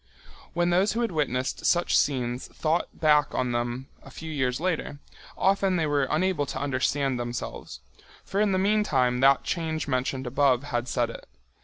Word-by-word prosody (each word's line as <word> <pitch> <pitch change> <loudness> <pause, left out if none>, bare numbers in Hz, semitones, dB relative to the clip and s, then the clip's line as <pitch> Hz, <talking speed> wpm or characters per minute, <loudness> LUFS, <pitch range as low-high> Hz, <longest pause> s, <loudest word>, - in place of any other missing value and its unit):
When 175 0 +1
those 185 +4 +3
who 235 - -1
had 235 - 0
witnessed 130 -5 -1
such 175 0 +2
scenes 125 -3 0
thought 160 +2 -1
back 150 -2 +2
on 125 -1 0
them 120 +2 -2
a - - -13
few 160 +4 -8
years 130 -4 -1
later, 165 -4 -2 0.4
often 195 -1 +2
they 165 -3 +1
were 145 -2 +1
unable 160 -2 +1
to 130 - -4
understand 135 -1 0
themselves. 120 -1 -6 0.4
For 200 - -1
in 210 -2 +2
the 190 - +2
meantime 185 -12 +2
that 135 +1 +5
change 160 -3 -2
mentioned 130 0 -1
above 130 0 +2
had 120 -3 -2
set 120 -2 0
it. - - -11
145 Hz, 170 wpm, -26 LUFS, 130-175 Hz, 0.4 s, that